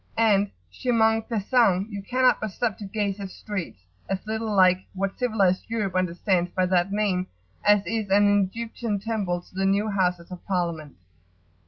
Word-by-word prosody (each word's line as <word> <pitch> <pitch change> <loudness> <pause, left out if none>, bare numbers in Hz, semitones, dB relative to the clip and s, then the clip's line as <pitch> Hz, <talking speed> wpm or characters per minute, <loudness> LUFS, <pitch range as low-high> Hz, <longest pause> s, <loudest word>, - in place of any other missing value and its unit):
And, 205 -3 +3 0.2
chemin 225 -3 +2
faisant, 215 -3 +2
you 200 -1 -5
cannot 255 +5 +2
but 215 - -2
stop 220 +1 -2
to 205 - -6
gaze 200 0 -2
at 195 -1 -5
streets 190 - -6 0.3
as 195 +1 -3
little 220 0 -3
like 185 -2 +5 0.2
what 195 +1 -3
civilised 205 -7 +1
Europe 210 -5 -2
understands 180 0 0
by 185 +1 0
that 180 +1 +1
name 195 -3 0 0.4
as 205 -1 +4
is 215 +2 -2
an 205 +1 +4
Egyptian 230 -1 -3
temple 195 -4 -2
to - - -23
the 190 +1 -2
new 200 +2 +1
Houses 180 -3 -1
of 180 - -8
Parliament. 170 -6 -2
200 Hz, 165 wpm, -25 LUFS, 185-220 Hz, 0.4 s, like